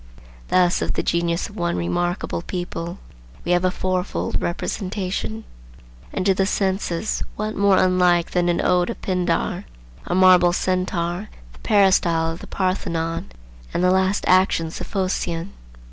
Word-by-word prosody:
Thus 180 -1 +3
of - - -1
the - - -1
genius 170 0 0
of 205 - -14
one 170 - -1
remarkable 170 - -1
people 175 0 -5 0.5
we - - 0
have 175 0 +3
a 185 - +3
fourfold 185 0 -2
representation: 185 - -3 0.7
and 185 - -2
to 195 - +5
the 190 0 +1
senses 190 -1 -1
what 215 +1 -3
more 200 -1 +4
unlike 180 -2 +3
than 175 -1 +1
an 170 - +1
ode 180 +1 +2
of 235 - -5
Pindar, 180 0 -1 0.4
a - - 0
marble 180 -1 +6
centaur, 185 +1 -1 0.2
the - - -17
peristyle 175 -5 +3
of 165 - -7
the - - -10
Parthenon, 165 - -2 0.4
and 175 - +1
the 180 - +4
last 190 +1 +1
actions 180 -3 +2
of - - -5
Phocion? 185 -2 -2
180 Hz, 145 wpm, -22 LUFS, 170-190 Hz, 0.7 s, marble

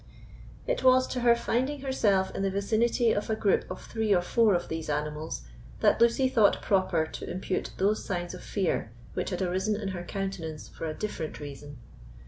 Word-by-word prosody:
It - - -1
was 255 0 +6
to 250 - -2
her 240 -1 +5
finding 260 +4 -1
herself 205 -8 +1
in - - -3
the 195 - +1
vicinity 225 +4 +2
of 205 - -1
a 220 - +2
group 205 -2 +1
of 185 - -7
three 220 -3 +1
or 175 - +2
four 220 +1 +3
of 175 - -2
these 160 -1 -4
animals, 150 - -3 0.4
that - - +4
Lucy 235 +3 +4
thought 225 -5 +4
proper 185 -5 +2
to - - -7
impute 185 +1 -2
those 205 +3 +1
signs 175 -2 -3
of 180 - -8
fear 180 - -1 0.2
which - - -2
had 190 -1 -2
arisen 190 +4 0
in 200 -3 -3
her 180 -2 -5
countenance 185 -5 -5
for 165 - -6
a 155 - -4
different 205 -7 -4
reason. 145 0 -8
195 Hz, 190 wpm, -28 LUFS, 175-225 Hz, 0.4 s, was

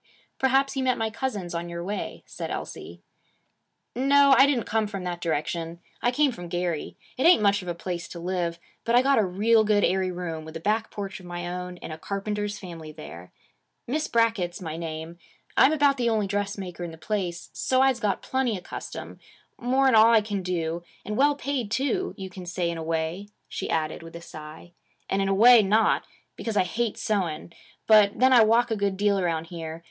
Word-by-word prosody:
'Perhaps 270 +1 +2
you 265 - 0
met 255 -1 +2
my 225 -1 -1
cousins 210 -8 -4
on 170 0 -4
your 170 0 -5
way,' 200 +3 -5
said - - -6
Elsie. - - -7 0.9
'No. 280 +2 +5
I 270 - +7
didn't 260 -5 +1
come 220 -1 0
from 200 -3 -6
that 175 -1 -4
direction. 165 +1 -2 0.2
I 240 - +3
came 280 +3 +2
from 175 -7 -8
Gary. 175 -2 -3 0.2
It 265 - +4
ain't 345 -11 +6
much 200 0 +3
of 180 - -10
a 175 - -2
place 170 0 -5
to 170 - -9
live. 175 -1 -2 0.3
But 230 - +1
I 245 - +6
got 275 -2 +4
a - - +4
real 215 +5 +3
good 210 -1 +2
airy 190 0 +2
room, 175 -3 -5
with 160 +1 -7
a - - -9
back 215 +5 0
porch 195 -2 -6
of 180 - -12
my 175 0 -5
own, 180 0 -5
in 165 - -8
a 155 - -7
carpenter's 205 +2 -3
family 165 -5 -9
there. 90 - -11 0.5
Miss 305 +5 -1
Brackett's 225 -7 +1
my 160 -4 -5
name. 165 +1 -6 0.4
I'm 275 - +6
about 285 -2 +3
the 240 -2 +1
only 215 -2 +1
dressmaker 195 -3 -3
in 175 - -4
the 160 - -11
place, 175 0 -3
so's 260 -1 +2
I - - +3
get - - -2
plenty 260 -5 0
of 180 - -10
custom, - - -8 0.4
more 260 +3 +2
'n 260 - +4
all 220 0 +8
that 230 0 +6
I - - +4
can 205 -2 -3
do; 170 -2 -2 0.2
and 210 - -3
well 285 +4 +4
paid, 275 -6 -3
too, 280 - -1
you 190 -2 -7
can 180 -1 -9
say 175 -1 -1
in 170 - -5
a - - -4
way,' 165 +4 -2 0.2
she - - -5
added 155 0 -1
with 165 0 -11
a 170 - -8
sigh; 155 +1 -11 0.4
'and 195 - 0
in 195 - 0
a - - +2
way, 235 +3 +8
not; 210 +3 +2 0.3
because 225 -2 -3
I 190 - +5
hate 225 +5 -2
sewing. 170 -6 -2 0.3
But 210 -2 +5
then 260 +1 +5
I 240 - +8
walk 230 +2 +3
a - - +2
good 200 -2 -1
deal 200 0 +2
around 165 -3 -1
here. 165 -1 -6
195 Hz, 215 wpm, -26 LUFS, 170-230 Hz, 0.9 s, all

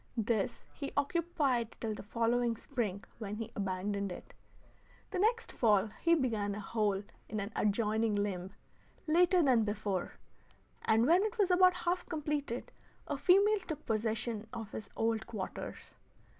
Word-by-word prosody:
This 220 -2 0
he 280 -2 -5
occupied 285 -6 +1
till 220 -2 -2
the - - -7
following 230 +2 +1
spring 215 -7 -3 0.2
when 210 -2 -4
he 225 +1 -5
abandoned 200 0 -2
it. - - -9 0.8
The 370 - -2
next 465 +4 +2
fall 210 -3 +3
he 335 0 +5
began 220 -8 0
a - - -5
hole 205 -1 0 0.3
in 215 - -2
an 200 +2 -4
adjoining 215 +1 +1
limb, 190 -3 -1 0.6
later 350 +2 +4
than 250 -5 +4
before, 205 -3 -2 0.7
and 225 +1 +4
when 340 +6 +5
it 435 +2 -2
was 395 -3 +3
about 365 0 +6
half 355 0 -1
completed 295 -6 -2 0.3
a 290 - -2
female 395 +8 +5
took 315 -6 -7
possession 220 0 -1
of 225 -3 -6
his 205 -2 -6
old 225 -1 0
quarters. 210 -5 -6
230 Hz, 145 wpm, -33 LUFS, 210-310 Hz, 0.8 s, about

